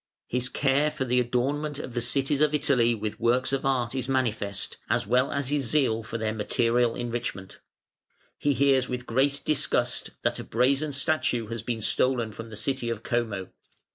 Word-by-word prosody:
His 125 +1 -1
care 140 +3 +2
for 150 -3 -3
the 125 0 +2
adornment 135 +5 -1
of 130 -4 -6
the 120 - -1
cities 135 +4 +1
of 150 0 +3
Italy 125 -5 +3
with 110 0 -4
works 125 +3 +2
of 135 0 0
art 125 -3 0
is 130 -1 -2
manifest, 110 -7 -1
as - - +1
well 125 +5 +2
as 140 -2 -1
his 145 -2 0
zeal 115 -3 +2
for 115 +1 -5
their 110 -1 -1
material 115 +2 +1
enrichment. 120 -5 -4 0.8
He 145 - +2
hears 135 -1 +3
with 125 0 -4
great 135 +4 +1
disgust 135 -4 0
that - - 0
a - - -5
brazen 135 +6 +1
statue 130 -6 0
has 115 -1 -4
been 115 -1 -3
stolen 120 0 +1
from 115 +2 -9
the 110 - -8
city 120 +3 -1
of 115 -1 -4
Como. 110 -6 -2
125 Hz, 180 wpm, -27 LUFS, 115-135 Hz, 0.8 s, of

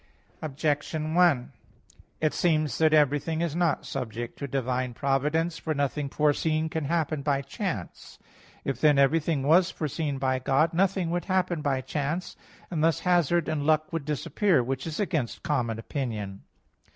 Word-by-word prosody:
Objection 155 +1 -2
1: 165 -9 +3 0.7
It 155 -1 +2
seems 155 -6 +1
that 160 -1 +4
everything 150 +1 +2
is 170 -3 -1
not 175 -3 +1
subject 120 -3 -5
to 140 - -3
divine 130 -2 -2
providence. 150 +5 0
For 155 -1 -2
nothing 140 0 -1
foreseen 155 +2 +1
can 160 -2 -3
happen 155 -1 0
by 140 -1 0
chance. 135 - -5 0.5
If 135 - -2
then 150 -2 +5
everything 145 +1 +2
was 170 +5 +5
foreseen 150 -1 -3
by 130 -1 0
God, 140 +5 +2
nothing 185 -1 +1
would 175 0 -1
happen 185 -4 0
by 135 -3 0
chance. 150 +6 -3 0.4
And 155 -3 -1
thus 165 -3 +2
hazard 175 -2 +2
and 155 -2 -1
luck 155 +1 +1
would 165 -4 -2
disappear; 155 - +1
which 135 +4 -3
is 155 - -4
against 160 - -2
common 125 -9 0
opinion. 110 -6 -5
150 Hz, 150 wpm, -27 LUFS, 135-165 Hz, 0.7 s, then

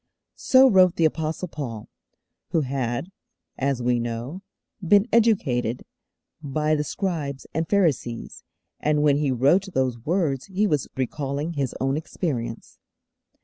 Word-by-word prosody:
So 260 0 +6
wrote 185 -6 +5
the 165 - +2
Apostle 160 +3 -1
Paul, 120 -10 -6 0.6
who 165 -2 +1
had, 130 +4 -3 0.5
as 135 -2 0
we 120 0 +2
know, 120 +9 -4 0.4
been 200 +5 +4
educated 140 - +2 0.6
by 150 +1 0
the 150 -1 +1
Scribes 150 -4 -3
and 160 +2 -2
Pharisees, 150 - 0 0.4
and 150 0 +1
when 145 -2 +4
he 145 -1 0
wrote 140 - +3
those 130 -3 0
words 150 -1 -1
he 200 +2 0
was 150 -9 0
recalling 140 +4 -2
his 140 -5 -2
own 135 +2 0
experience. 125 -8 -4
150 Hz, 130 wpm, -24 LUFS, 130-170 Hz, 0.6 s, So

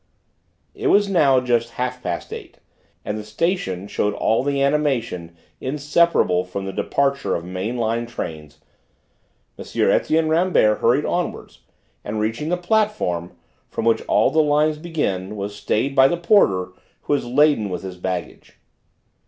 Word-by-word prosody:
It 410 0 -3
was 205 - +4
now 150 -9 +4
just 120 -2 0
half 125 0 -3
past 90 -6 -4
eight, - - -9 0.5
and 105 +1 -3
the - - -6
station 105 - -2
showed 105 0 -1
all 110 - +1
the 140 +1 -1
animation 125 - -1 0.2
inseparable 145 - +2
from 95 +2 -6
the 95 - -5
departure 140 +6 0
of 85 - -4
main 95 +7 -4
line 115 0 -1
trains. 75 -9 -7 1.0
M. - - -4
Etienne 160 0 +2
Rambert 160 -10 +3
hurried 125 +6 +2
onwards, 175 0 -3 0.4
and 105 +1 -4
reaching 115 +8 -2
the 180 - +1
platform 180 - 0 0.4
from - - -4
which 115 -1 +3
all - - +3
the 160 - +4
lines 150 +1 +2
begin, 105 - -3
was 100 0 -5
stayed 110 +6 -1
by 135 0 +7
the 175 - -1
porter 100 - +3 0.3
who - - -1
was 145 - -1
laden 130 -5 +3
with 90 - -5
his 95 -1 -7
baggage. 90 0 -5
125 Hz, 150 wpm, -21 LUFS, 100-150 Hz, 1.0 s, by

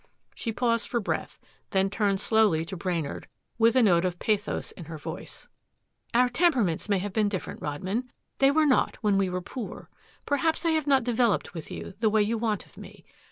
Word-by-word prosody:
She 230 - -4
paused 230 0 +1
for 240 - 0
breath, 210 - -3 0.3
then 195 -1 +2
turned 200 -2 +1
slowly 210 -7 +3
to 190 - -6
Brainard 170 -5 -3 0.3
with 230 +1 +5
a 255 - +5
note 175 -5 +4
of 180 -1 -1
pathos 210 0 -1
in 170 - -10
her 160 0 -7
voice. 150 - -8 0.7
"Our 250 +1 +5
temperaments 245 - +1
may 200 - +3
have 190 +1 -4
been 210 -1 +2
different, 190 -3 -5
Rodman. 190 - -3 0.3
They 270 - +6
were 310 +2 +3
not 270 -3 +3
when 205 -3 +2
we 190 -1 +1
were 180 0 -3
poor. 235 +2 -7 0.3
Perhaps 320 +4 +1
I 330 - +3
have 315 -2 0
not 270 -3 +4
developed 235 -3 +1
with 165 -3 -7
you, - - -7
the 220 -1 +3
way 215 0 +3
you 225 +2 -1
want 215 -3 -1
of - - -24
me. - - -12
215 Hz, 200 wpm, -27 LUFS, 190-245 Hz, 0.7 s, They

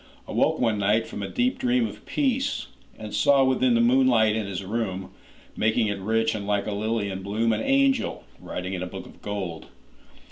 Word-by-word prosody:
Awoke - - +1
one 110 -4 +1
night 105 +3 +2
from 105 - -7
a 100 - -3
deep 250 +2 0
dream 250 -2 +2
of - - -9
peace, 275 0 0 0.3
And 110 -1 -8
saw—within 130 -3 +4
the 115 - +4
moonlight 120 -3 +4
in 110 -2 -2
his 95 -1 -4
room, 95 -3 -3 0.4
Making 110 0 +2
it 100 -1 -3
rich 110 +3 +1
and 100 -2 -5
like 105 -1 0
a 105 - -3
lily 105 0 -1
in 95 0 -5
bloom—An 110 +3 0
angel, 275 -1 +2 0.2
writing 90 +1 -5
in 90 - -3
a 90 - -3
book - - -8
of - - -16
gold. 95 -5 -5
110 Hz, 185 wpm, -25 LUFS, 100-130 Hz, 0.4 s, saw—within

